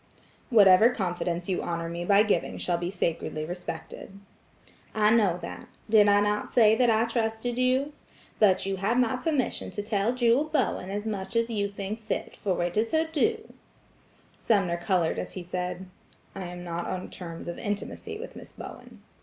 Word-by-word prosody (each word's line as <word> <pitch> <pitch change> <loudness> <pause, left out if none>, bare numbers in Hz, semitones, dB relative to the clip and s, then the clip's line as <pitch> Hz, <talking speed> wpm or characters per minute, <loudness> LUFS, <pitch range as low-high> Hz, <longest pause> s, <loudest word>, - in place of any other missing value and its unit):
"Whatever 210 -2 +7
confidence 175 -5 -2
you 185 - -1
honor 170 -1 -3
me 170 +1 -4
by 200 +3 +5
giving 215 - 0
shall 175 -1 -1
be 175 0 -2
sacredly 165 -4 -2
respected." 180 +3 -7 0.8
"I 210 0 +4
know 205 -7 +3
that. - - -7 0.2
Did 210 -2 +7
I 205 0 +5
not 210 0 -1
tell 225 -4 +6
you 220 - +4
that 245 -2 +4
I 225 0 +3
trusted 230 0 -1
you? 260 +3 +1 0.5
But 190 -4 +4
you 195 0 -2
have 205 +6 0
my 250 0 +2
permission 275 0 -1
to 205 - -4
tell 210 +1 0
Jewel 245 +3 +3
Bowen 265 -11 -1
as 205 +2 -3
much 210 0 -4
as 230 0 +1
you 200 -2 0
think 200 +2 -5
fit, 220 - -4
for 185 -4 -1
it 175 +3 -2
is 225 +5 0
her 320 0 +3
due." 435 +8 0 0.9
Sumner 195 -6 +1
colored 175 -2 0
as - - -5
he 185 - -6
said: 180 +1 -4 0.5
"I 190 -1 -6
am 175 0 -8
not 170 0 -4
on 185 0 -4
terms 170 -3 -8
of 170 - -5
intimacy 215 - -4
with - - -9
Miss - - -10
Bowen." - - -11
205 Hz, 180 wpm, -27 LUFS, 180-230 Hz, 0.9 s, Whatever